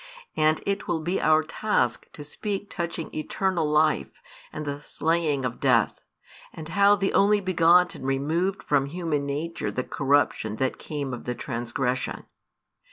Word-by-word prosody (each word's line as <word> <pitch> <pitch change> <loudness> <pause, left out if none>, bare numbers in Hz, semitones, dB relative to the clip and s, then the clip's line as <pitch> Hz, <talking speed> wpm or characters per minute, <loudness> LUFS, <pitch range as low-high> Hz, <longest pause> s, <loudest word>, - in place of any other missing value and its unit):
And 155 0 +2
it 200 0 -2
will 165 - 0
be 175 +4 -1
our 155 0 +4
task 155 - -1
to 150 - -9
speak 200 +7 -5
touching 170 -2 -4
eternal 170 +1 -1
life 150 - +1 0.3
and 150 - -6
the 145 0 -4
slaying 155 -4 0
of 125 -1 -4
Death, 125 -5 +2 0.5
and 160 0 -9
how 200 +4 +5
|318 - - -9
the 195 - +1
Only 205 +1 +4
begotten 180 -2 +3
removed 155 +8 -1
from 140 -2 +1
human 155 -3 -2
nature 155 +4 -3
the 130 - -2
corruption 135 -7 +1
that 130 +3 -1
came 140 -4 -4
of 120 - -7
the 125 - -2
transgression. 125 +1 -3
155 Hz, 155 wpm, -26 LUFS, 135-175 Hz, 0.5 s, how